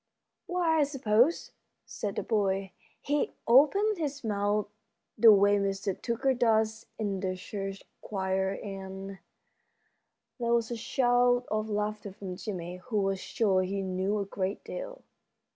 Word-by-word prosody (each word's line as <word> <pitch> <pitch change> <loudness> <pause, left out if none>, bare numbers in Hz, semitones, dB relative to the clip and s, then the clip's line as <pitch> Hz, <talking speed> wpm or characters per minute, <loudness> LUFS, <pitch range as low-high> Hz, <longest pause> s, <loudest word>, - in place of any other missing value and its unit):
] - - -56
"Why, 345 -3 +2
I - - +5
suppose," 270 +1 +2 0.3
said 205 -2 -4
the - - -2
boy, 195 -3 0 0.3
"he 290 0 -1
opens 345 - +5
his 285 -3 -3
mouth 205 -1 0 0.5
the 230 -2 +8
way 205 0 +5
Mr. 195 -1 -2
Tucker 245 +3 +1
does 220 -2 +1
in 200 -3 -2
the 185 -1 -2
church 195 +1 -6 0.2
choir, 190 -1 -1
and 195 -1 -7 0.6
" - - -48
There 235 0 +2
was 235 0 0
a - - -1
shout 245 0 +2
of 215 0 -1
laughter 210 -1 -2
from 190 -2 -7
Jimmie, 180 -3 -5
who 215 +4 -4
was 195 -1 0
sure 195 -2 +1
he 195 +1 -2
knew 190 +2 -1
a 200 - -1
great 195 0 -3
deal. - - -7
210 Hz, 145 wpm, -29 LUFS, 195-245 Hz, 0.6 s, the